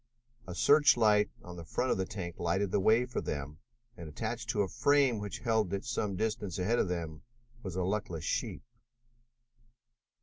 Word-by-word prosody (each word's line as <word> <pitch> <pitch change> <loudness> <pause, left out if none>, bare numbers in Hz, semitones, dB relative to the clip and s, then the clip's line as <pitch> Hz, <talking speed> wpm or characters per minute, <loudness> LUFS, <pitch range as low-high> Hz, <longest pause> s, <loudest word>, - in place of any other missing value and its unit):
A 90 - -6
search 145 - +5
light 105 -2 +4
on 90 0 -9
the 85 - -7
front 125 +10 -1
of - - +1
the 95 - -1
tank 90 -5 -6
lighted 90 +3 0
the 100 - +2
way 110 +5 +4
for 125 - -3
them 75 +1 -5 0.4
and, 85 -2 -8
attached 115 +8 -4
to 105 -3 +2
a - - -2
frame 130 +1 +3
which 105 +3 -5
held 110 -4 0
it 100 +3 -3
some 110 -4 -2
distance 105 -3 -2
ahead 105 +6 +1
of - - +2
them, 80 -3 -4 0.4
was 95 -6 -6
a 95 - 0
luckless 90 -4 -2
sheep. - - -2
100 Hz, 180 wpm, -31 LUFS, 90-115 Hz, 0.4 s, search